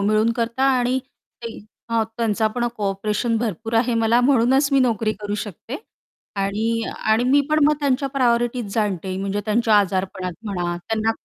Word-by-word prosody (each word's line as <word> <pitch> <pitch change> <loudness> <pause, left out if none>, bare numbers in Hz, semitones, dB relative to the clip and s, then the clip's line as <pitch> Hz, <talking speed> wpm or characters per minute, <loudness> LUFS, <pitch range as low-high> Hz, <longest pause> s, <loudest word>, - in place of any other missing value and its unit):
मिळून 215 +3 +2
करता 235 +2 -1 0.2
आणि 250 +1 +1 0.4
काही 230 -1 -7 0.3
हां, 230 -1 +2
त्यांचा 220 -1 +1
पण 240 -1 0
कोऑपरेशन 210 +3 -1
भरपूर 225 0 -3
आहे 235 +1 +2
मला 230 +2 +4
म्हणूनच 265 +2 +3
मी 275 - +5
नोकरी 225 -3 +1
करू 205 0 -3
शकते 210 - -6 0.6
आणि 220 +4 0 0.3
आणि 220 +3 +3
मी 275 +3 +4
पण 305 -1 +4
मग 300 +1 +4
त्यांच्या 275 -1 +1
प्रायोरिटीज 240 -4 0
जाणते. 190 -4 -1
म्हणजे 195 +1 -2
त्यांच्या 220 +1 +2
आजारपणात 185 -2 -1
म्हणा, 175 -4 -2
त्यांना 220 +5 -1
225 Hz, 155 wpm, -22 LUFS, 205-245 Hz, 0.6 s, मी